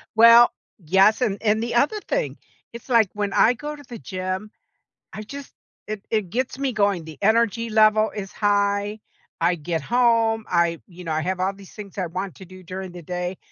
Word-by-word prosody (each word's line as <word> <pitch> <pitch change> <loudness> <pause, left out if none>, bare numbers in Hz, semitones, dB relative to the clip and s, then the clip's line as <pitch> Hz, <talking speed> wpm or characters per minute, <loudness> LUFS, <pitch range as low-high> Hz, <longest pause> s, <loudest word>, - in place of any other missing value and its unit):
Well, 230 +1 +8 0.3
yes, 195 - +4
and 205 -5 +1
and 215 0 +2
the 235 - -3
other 295 - +2
thing, - - -1 0.4
it's 235 +2 -11
like 225 -5 +4
when 205 -1 -2
I 240 - +5
go 295 +4 -6
to 290 - -13
the 235 -2 -8
gym, 185 +2 -5 0.6
I 215 - -6
just 280 +5 -9 0.4
it 215 -1 -5
it 215 -5 0
gets 255 +4 -2
me 270 -3 -1
going, 200 -5 +1
the 160 -1 -11
energy 230 +2 +2
level 215 0 +4
is 195 -2 -6
high, 205 0 0 0.4
I 175 +2 +3
get 165 0 -3
home, 230 -2 +2
I 170 -2 +1
you 180 0 -12
know, 165 - -4
I 155 - 0
have 185 +2 -2
all 190 +2 0
these 195 -1 -15
things 205 -2 -10
I 185 -3 -1
want 185 +2 -5
to 190 - -12
do 185 +1 -14
during 185 +1 -7
the 175 0 -10
day, 180 +2 -4
205 Hz, 200 wpm, -23 LUFS, 185-230 Hz, 0.6 s, Well